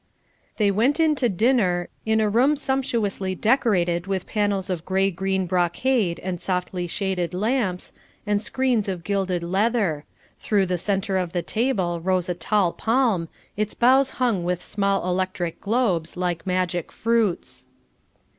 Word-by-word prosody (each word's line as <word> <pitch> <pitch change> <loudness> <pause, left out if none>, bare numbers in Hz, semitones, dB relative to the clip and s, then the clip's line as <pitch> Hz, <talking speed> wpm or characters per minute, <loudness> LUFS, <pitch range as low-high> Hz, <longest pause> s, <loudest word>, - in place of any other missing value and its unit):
They 205 -2 +3
went 245 - +2
in 320 -1 +4
to 245 -3 +2
dinner, 190 -4 +2 0.2
in 220 0 +3
a 215 - +2
room 250 +8 +3
sumptuously 235 -9 -1
decorated 185 -7 +1
with 190 -2 -2
panels 205 -3 -1
of 170 -3 -3
grey 190 +1 +1
green 190 +1 -1
brocade 180 +3 +1
and 180 -2 -4
softly 180 -1 -2
shaded 180 -2 -2
lamps, 210 -3 -1 0.3
and 205 -1 +1
screens 245 -1 0
of 180 -3 -4
gilded 190 -3 -1
leather; 190 -4 0 0.3
through 205 -3 +1
the 180 -1 -1
centre 195 0 0
of 175 -2 -3
the 175 -2 -1
table 200 -8 0
rose 185 0 0
a - - +1
tall 185 0 +1
palm, 225 -8 +1 0.3
its 210 0 -2
boughs 265 +3 +4
hung 235 -8 +1
with 180 0 -2
small 195 -2 0
electric 180 -2 -2
globes 200 -8 0
like 180 0 -2
magic 180 -2 -1
fruits. 200 - -1
195 Hz, 145 wpm, -23 LUFS, 180-225 Hz, 0.3 s, in